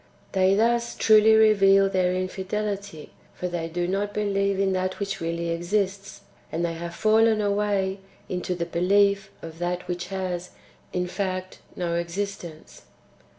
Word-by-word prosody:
They 190 0 +3
thus 235 +2 +1
truly 220 0 +6
reveal 195 -3 +5
their 185 -2 +1
infidelity; 195 -1 -4 0.3
they 175 -2 -3
do 175 +1 -2
not 200 +2 -2
believe 200 -1 0
in 195 -1 +2
that 185 0 -1
which 200 -2 -3
really 170 0 -2
exists, 195 +4 -2 0.3
and 170 +2 -1
they 170 - -2
have 170 +1 -6
fallen 220 +2 +3
away 200 -2 0 0.3
into 180 0 -3
[the 170 -1 -2
belief 195 +3 +2
of] 165 0 -9
that 175 +1 -3
which 175 -1 -4
has, 185 -2 -4 0.4
in 180 0 -1
fact, 185 0 -4 0.2
no 170 -1 -2
exist 185 +4 -3
ence. 160 -2 -12
190 Hz, 145 wpm, -25 LUFS, 175-200 Hz, 0.4 s, truly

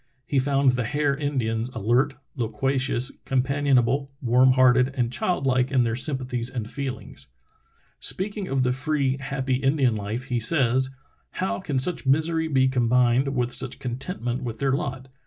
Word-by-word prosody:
He 140 - +1
found 135 0 +3
the 125 0 -1
Hare 145 +2 0
Indians 125 -5 -2
alert, 120 +6 +1 0.2
loquacious, 130 +2 0
companion 140 +1 +1
able, 135 +4 +1
warm 125 +1 +4
hearted, 125 0 +4
and 120 -2 0
childlike 130 -2 0
in 130 -3 +3
their 115 -1 -1
sympathies 130 -2 -2
and 115 -5 -5
feelings. 130 - -6 0.7
Speaking 200 0 -2
of 135 -1 0
the 125 - +1
free, 135 0 0
happy 135 -2 -2
Indian 135 -2 +2
life 105 +4 -4
he 120 -1 0
says: 130 0 +3 0.4
"How 190 - -2
can 145 -7 -3
such 140 +2 +1
misery 160 +3 +2
be 130 -4 +3
combined 125 +1 +2
with 125 -1 0
such 135 -1 -1
contentment 125 0 -4
with 115 -3 -5
their 135 +3 0
lot? 135 -3 -3
130 Hz, 155 wpm, -24 LUFS, 125-140 Hz, 0.7 s, warm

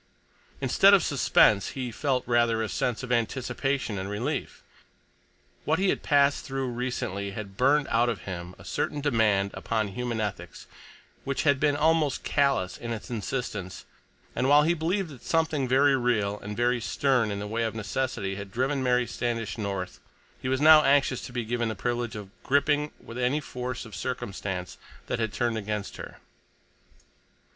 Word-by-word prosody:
Instead 195 +10 +6
of 195 - +2
suspense 110 -6 +3
he 125 -2 -3
felt 130 +1 0
rather 120 -2 +2
a 110 - -3
sense 125 +1 -1
of 125 - -5
anticipation 125 0 -1
and 95 +1 -4
relief. 125 +8 -3 1.0
What 160 +2 +1
he 190 0 +2
had - - 0
passed 145 -1 +3
through 135 -1 -3
recently 115 -5 -3
had 100 -3 -7
burned 140 +5 +3
out 120 +1 +3
of 120 - -3
him 90 -1 -7
a 90 - -14
certain 95 +10 -2
demand 110 -8 +2
upon 110 -3 -2
human 120 +3 -3
ethics 95 -6 -5 0.6
which 140 -1 -2
had 140 -3 +3
been 145 0 +2
almost 155 -2 +2
callous 135 -11 +1
in 120 -1 -5
its 115 +1 -6
insistence, 105 -4 -4 0.5
and 130 - +1
while 145 +1 +7
he 165 +3 +3
believed 175 +3 -1
that 135 -5 -12
something 160 -5 +1
very 135 +2 +4
real 105 -5 0
and 105 0 -7
very 120 0 +1
stern 130 -2 +1
in 100 - -3
the 100 - -4
way 110 +3 -2
of 115 -1 -1
necessity 105 -2 -2
had 100 0 -7
driven 135 +5 0
Mary 125 -1 +2
Standish 115 -2 -3
north, 95 -3 -4 0.4
he 130 - -2
was 130 0 +1
now 155 +1 +8
anxious 135 -2 +3
to - - -8
be 120 -2 -3
given 120 0 -1
the 110 - -3
privilege 120 -1 -2
of 100 -2 -8
gripping 145 +2 +1
with 115 +2 -9
any 125 +4 +1
force 125 -4 -5
of 110 -4 -10
circumstance 95 -4 -4 0.3
that - - -3
had 110 -2 -1
turned 120 -1 -1
against 105 -1 -4
her. - - -9
120 Hz, 170 wpm, -27 LUFS, 105-140 Hz, 1.0 s, now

